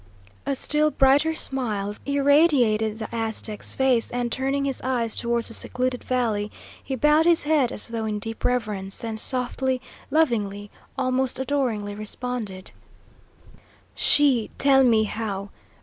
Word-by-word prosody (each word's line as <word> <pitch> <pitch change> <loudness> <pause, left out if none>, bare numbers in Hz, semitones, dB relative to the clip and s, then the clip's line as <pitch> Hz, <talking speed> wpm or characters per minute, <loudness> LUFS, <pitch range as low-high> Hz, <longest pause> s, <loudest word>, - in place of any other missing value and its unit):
A 280 - 0
still 300 +3 +1
brighter 290 +3 +3
smile 210 -9 -1
irradiated 280 -7 +3
the 220 -1 -5
Aztec's 220 -1 -2
face, 260 -3 +2
and 245 -1 -3
turning 270 +2 -1
his 270 -1 -3
eyes 240 -3 -1
towards 235 0 -1
the - - -6
secluded 250 +2 -1
valley, 220 -5 -1 0.3
he 265 - -4
bowed 300 +5 +3
his 340 -1 +5
head 295 -5 +2
as - - -3
though 230 -1 -3
in 215 -1 -2
deep 225 +2 -4
reverence, 210 -6 -1
then 225 -1 -5
softly, 255 +2 +1 0.3
lovingly, 210 -9 0 0.3
almost 260 0 +1
adoringly, 250 -7 -1
responded: 215 -2 -5 1.2
"SHE 275 -6 +3
tell 270 -1 +4
me 225 -3 +4
how. 205 -2 -4
245 Hz, 135 wpm, -24 LUFS, 220-270 Hz, 1.2 s, his